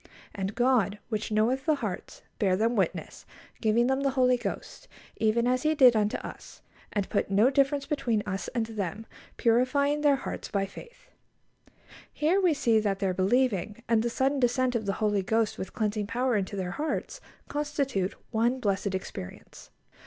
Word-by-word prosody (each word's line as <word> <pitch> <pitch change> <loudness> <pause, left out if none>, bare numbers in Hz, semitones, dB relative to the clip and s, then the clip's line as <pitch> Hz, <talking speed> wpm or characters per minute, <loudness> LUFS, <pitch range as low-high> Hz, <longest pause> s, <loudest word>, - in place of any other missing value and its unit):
And 195 +1 -4
God, 240 -5 +2
which 215 -1 -3
knoweth 245 +7 +1
the 310 - +4
hearts, 215 -10 -6 0.2
bare 190 -3 +3
them 230 +3 +1
witness, 190 -6 -2 0.4
giving 230 +1 +3
them 265 +2 +1
the 275 - +2
Holy 255 -1 +3
Ghost, 375 - -6 0.3
even 225 +2 +2
as 255 +1 +2
He 310 0 +1
did 255 -5 +7
unto 210 -1 +1
us; - - -10 0.3
and 205 -2 -1
put 200 - -1
no 210 +6 +4
difference 275 +1 +2
between 240 -8 0
us 190 -1 -3
and 235 -3 -1
them, 215 -1 -4 0.3
purifying 270 +5 +2
their 290 -2 +4
hearts 270 - -5
by 200 -2 0
faith." - - -13 1.0
Here 335 +6 +2
we 350 -5 +3
see 230 -5 +3
that 205 -2 0
their 195 -2 0
believing, 210 +1 0
and 225 -1 +3
the 235 - 0
sudden 270 +3 0
descent 250 0 +2
of 220 -4 -2
the 195 - +1
Holy 205 -1 +2
Ghost 220 +3 0
with 190 - -6
cleansing 210 -2 -1
power 245 +2 0
into 200 0 -2
their 185 -2 -3
hearts, 310 - -3 0.3
constitute 280 -10 -2 0.2
one 240 +3 +1
blessed 200 -3 -1
experience. 95 - -8
230 Hz, 170 wpm, -28 LUFS, 205-265 Hz, 1.0 s, did